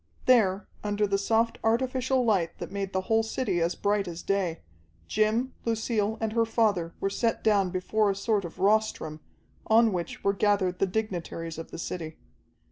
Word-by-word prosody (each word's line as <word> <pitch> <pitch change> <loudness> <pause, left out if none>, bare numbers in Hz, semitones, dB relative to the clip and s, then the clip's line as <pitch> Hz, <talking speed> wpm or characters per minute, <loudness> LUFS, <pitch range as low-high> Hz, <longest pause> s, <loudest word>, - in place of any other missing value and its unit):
There, 210 -6 +4 0.2
under 210 0 +1
the 200 -1 0
soft 225 +3 +1
artificial 255 +2 +1
light 190 -7 +1
that - - -7
made 195 -1 -3
the 190 - 0
whole 225 +4 +2
city 220 -5 -1
as 170 +1 +1
bright 205 -1 0
as 170 -1 -6
day, 190 -4 -1 0.5
Jim, 220 +5 +1
Lucille, 220 -1 0
and 220 -1 -2
her 230 0 +3
father 210 -7 +1
were 195 - -1
set 230 +3 0
down 200 -4 +3
before 200 +4 +1
a 195 - 0
sort 205 0 0
of 170 - -8
rostrum, 200 -6 +1 0.5
on 225 -1 +5
which 170 -2 -4
were 200 - +3
gathered 195 -3 +1
the 195 - +2
dignitaries 175 -5 -4
of 165 - -7
the - - -8
city. 160 -1 -5
205 Hz, 175 wpm, -27 LUFS, 185-225 Hz, 0.5 s, on